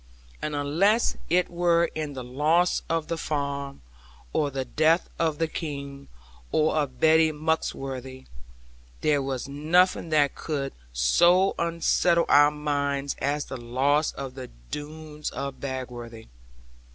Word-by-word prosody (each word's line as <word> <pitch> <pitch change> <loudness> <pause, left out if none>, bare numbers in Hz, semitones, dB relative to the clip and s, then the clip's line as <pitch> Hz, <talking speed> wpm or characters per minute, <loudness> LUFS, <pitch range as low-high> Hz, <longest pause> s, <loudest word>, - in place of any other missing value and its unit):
And 150 -1 -3
unless 170 +11 +2
it 180 +2 +3
were 170 -1 +3
in 155 -2 -4
the 130 -2 -6
loss 155 +8 +2
of 165 -1 -1
the 165 - -3
farm, 140 - -3 0.5
or 150 -2 +1
the 135 -1 -3
death 160 +5 +2
of 160 -3 +1
the 165 +1 0
King, 140 -3 -6 0.4
or 155 0 +2
of 145 -4 -1
Betty 160 0 +5
Muxworthy, 135 -4 -3 0.8
there 145 -2 +2
was 135 -2 -3
nothing 165 +5 +2
that 145 -3 +3
could 140 -3 -4 0.2
so 175 - +4
unsettle 170 0 +2
our 145 +1 +7
minds 140 -2 -2
as 145 +1 0
the 130 - -6
loss 135 +6 +1
of 135 -2 -6
the 130 -1 -8 0.2
Doones 150 0 -6
of 140 -1 -5
Bagworthy. 120 -4 -6
150 Hz, 130 wpm, -26 LUFS, 135-160 Hz, 0.8 s, our